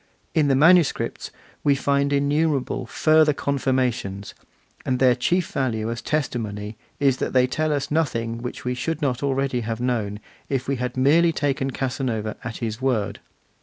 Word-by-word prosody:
In 155 -2 +3
the 135 - +3
manuscripts 165 +2 +3 0.3
we 140 -1 +4
find 140 0 +1
innumerable 140 -3 0
further 155 +2 +4
confirmations; 130 -8 -1 0.5
and 130 - 0
their 125 -1 +5
chief 175 +9 0
value 115 -4 -1
as 115 - -5
testimony 110 -8 -3 0.2
is 135 -2 +3
that - - -3
they 130 -1 +5
tell 155 +4 -1
us 145 -1 -2
nothing 115 -7 -1
which 125 +1 -6
we 125 - 0
should 155 +5 -3
not 130 -4 +1
have 140 +2 -1
already 135 -2 0 0.2
known, 110 -5 -1 0.3
if 135 -2 -1
we 140 -1 0
had 125 +1 -3
merely 160 +6 +4
taken 140 -3 -1
Casanova 125 -5 -2
at 115 -1 -5
his 115 0 -4
word. 110 -6 0
130 Hz, 160 wpm, -23 LUFS, 120-145 Hz, 0.5 s, their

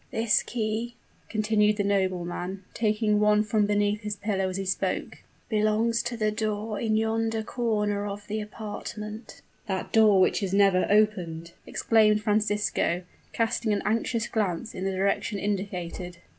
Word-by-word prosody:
"This 225 -1 +2
key," 230 +1 -3 0.3
continued 215 -1 +2
the 205 - +1
nobleman, 190 -1 -1
taking 210 -1 +1
one 210 0 +4
from 210 -1 +1
beneath 205 0 +1
his 210 -1 -3
pillow 195 -2 -1
as 185 - -4
he 195 - -3
spoke, 190 - -2 0.3
"belongs 220 +1 +2
to 240 0 -4
the 215 -1 +1
door 215 0 -2
in 220 -2 +1
yonder 225 0 0
corner 210 -3 -1
of 205 0 -6
the 215 +1 -3
apartment." 210 +1 -7 0.2
"That 190 -2 -3
door 215 -3 +6
which 185 - +3
is 195 -1 -1
never 195 -2 +4
opened!" 180 -6 +1 0.2
exclaimed 215 -2 +3
Francisco, 210 -4 +1 0.3
casting 225 -1 0
an 205 - -1
anxious 230 +1 0
glance 215 0 -2
in 185 - -4
the 195 - 0
direction 200 +3 0
indicated. 185 -3 -4
210 Hz, 145 wpm, -27 LUFS, 200-220 Hz, 0.3 s, door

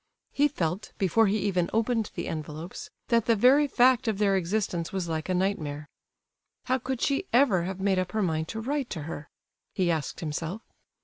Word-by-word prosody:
He 290 +1 +3
felt, 185 - -3
before 200 +4 +3
he 200 +2 +1
even 185 -4 0
opened 225 -1 +1
the - - -3
envelopes, 155 +2 -6 0.2
that 230 -1 +2
the 230 - +5
very 265 +7 +5
fact 255 -2 +4
of 215 -3 +1
their 200 -1 +3
existence 180 -2 -1
was 190 -3 -2
like 160 +1 -3
a 185 - +1
nightmare. 155 -6 -2 0.7
How 260 +1 0
could 255 0 -4
she 280 +7 0
ever 230 -9 +4
have 190 0 -4
made 190 -1 +2
up 185 -1 -3
her 215 -1 +1
mind 160 -3 -1
to 220 - -5
write 275 +2 -2
to 160 - -5
her? 150 -1 -7 0.5
he 180 -2 +2
asked 160 -3 -3
himself. 165 +6 -4
195 Hz, 190 wpm, -27 LUFS, 170-230 Hz, 0.7 s, the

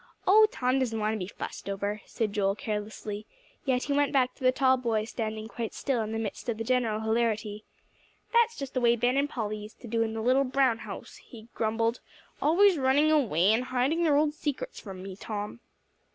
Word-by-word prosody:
"Oh, 430 +3 +7
Tom 255 +1 +1
doesn't 230 -4 -1
want 215 +1 0
to 220 - -3
be 180 - -4
fussed 200 - -7
over," 200 +2 -2
said 215 -3 -2
Joel 195 -1 +1
carelessly; 210 0 -5 0.4
yet 255 -2 +1
he 285 - -1
went 285 0 +2
back 255 -3 +2
to 270 - -14
the 255 - +6
tall 260 0 +4
boy 230 -4 0
standing 220 -1 -4
quite 230 -1 -5
still, 265 -5 0
in 215 0 -3
the 225 - -2
midst 225 +1 -4
of 225 - -1
the 225 - -3
general 230 -3 +1
hilarity. 220 -2 -1 0.7
"That's 470 0 +4
just 275 -2 -6
the 255 - 0
way 235 0 +5
Ben 245 +2 +1
and 280 +1 +1
Polly 215 -5 -3
used 210 +1 -11
to 240 - -9
do 230 0 0
in 225 -1 -1
the 225 - -2
little 255 +4 +3
brown 255 -3 +2
house," - - -8
he 230 -2 -14
grumbled 225 +1 0 0.4
"always 355 +3 +5
running 280 +4 +4
away, 215 - +3
and 245 +3 +1
hiding 260 +7 +1
their 300 -3 +4
old 300 0 +2
secrets 310 - -4
from 190 -3 -9
me, 190 -1 -7
Tom." 210 +2 -5
235 Hz, 210 wpm, -28 LUFS, 215-270 Hz, 0.7 s, Oh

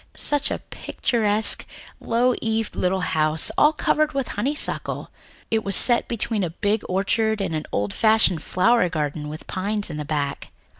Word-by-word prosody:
Such 290 -1 +2
a - - -2
picturesque, 215 -2 0 0.4
low 245 +2 +1
eaved 225 -1 -2
little 185 +1 0
house, 155 -2 +1
all 300 - +5
covered 310 0 +1
over - - -7
with 270 - -1
honeysuckle. 290 +4 -1 0.4
It 220 -1 +1
was 195 - -1
set 240 -1 +4
between 225 -2 -1
a 175 - -1
big 205 +5 -1
orchard 215 +3 0
and 195 -4 -2
an 155 -1 -3
old 100 -1 -1
fashioned 220 -6 +3
flower 185 0 +2
garden 150 -2 -3
with 155 +1 -7
great - - -11
pines 205 0 -1
at 150 - -6
the 150 - -3
back." 145 -2 -3
205 Hz, 170 wpm, -23 LUFS, 160-230 Hz, 0.4 s, all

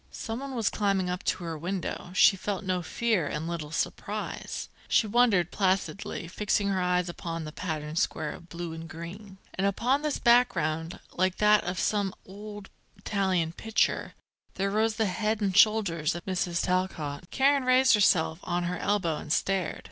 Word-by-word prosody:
Someone 260 +4 -5
was 225 -4 +1
climbing 195 -3 0
up 180 - -3
to - - -1
her 165 -1 -4
window. 175 +2 -4
She 195 - +6
felt 200 +1 -3
no 185 -2 -1
fear 205 -2 0
and 160 +3 -3
little 165 -3 -4
surprise. 160 - -4 0.2
She - - +3
wondered, 210 -6 +3
placidly, 190 -2 -1
fixing 205 +2 0
her 190 -1 0
eyes 180 0 +1
upon 165 -1 -5
the 155 - -6
patterned 155 -2 -3
square 150 - -1
of 170 - -12
blue 170 -1 -5
and 165 0 -8
green. 190 +5 -9 0.2
And 195 +1 0
upon 245 +8 +1
this 300 -1 -1
background, 170 -10 +2
like 185 +1 +1
that 210 0 +5
of 180 +1 -3
some 205 -3 0
old 205 +1 -10 0.3
Italian 190 -5 0
picture, 220 +4 0 0.4
there 195 +1 -1
rose 220 +1 +1
the 220 0 +1
head 215 +3 -1
and 195 -3 0
shoulders 195 -8 +4
of 175 - -7
Mrs. 180 -2 -1
Talcott. 175 -4 -2
Karen 275 0 +3
raised 255 0 +5
herself 175 -6 +3
on 175 0 -1
her 180 +1 -2
elbow 180 -7 0
and 150 - -7
stared. 190 +1 0
190 Hz, 170 wpm, -28 LUFS, 170-210 Hz, 0.4 s, She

